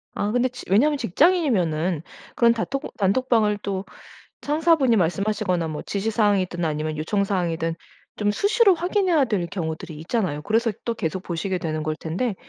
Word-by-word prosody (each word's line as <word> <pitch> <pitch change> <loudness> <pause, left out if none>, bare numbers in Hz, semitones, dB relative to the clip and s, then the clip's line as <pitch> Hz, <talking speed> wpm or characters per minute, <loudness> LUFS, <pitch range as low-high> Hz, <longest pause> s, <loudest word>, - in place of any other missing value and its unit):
아 205 +1 -1
근데 245 +1 +2
지 250 0 -10
왜냐하면 285 +10 +4
직장인이면은 190 - +2 0.3
그런 235 -1 +5
단톡 270 +5 -4
단톡방을 215 +1 +2
또 195 -1 -2 0.6
상사분이 300 -4 +3
말씀하시거나 180 -1 0
뭐 155 - -5
지시사항이든 200 -4 0
아니면 155 0 -2
요청사항이든 170 -2 -1 0.4
좀 205 -1 +1
수시로 405 - +4
확인해야 350 -3 +2
될 205 -7 -1
경우들이 160 -3 -5
있잖아요. 170 -4 -2
그래서 225 +5 +1
또 235 - -1
계속 170 -1 -3
보시게 180 +2 -2
되는 155 -2 -3
걸 155 0 -2
텐데 185 +9 -2
205 Hz, 385 characters per minute, -23 LUFS, 170-245 Hz, 0.6 s, 그런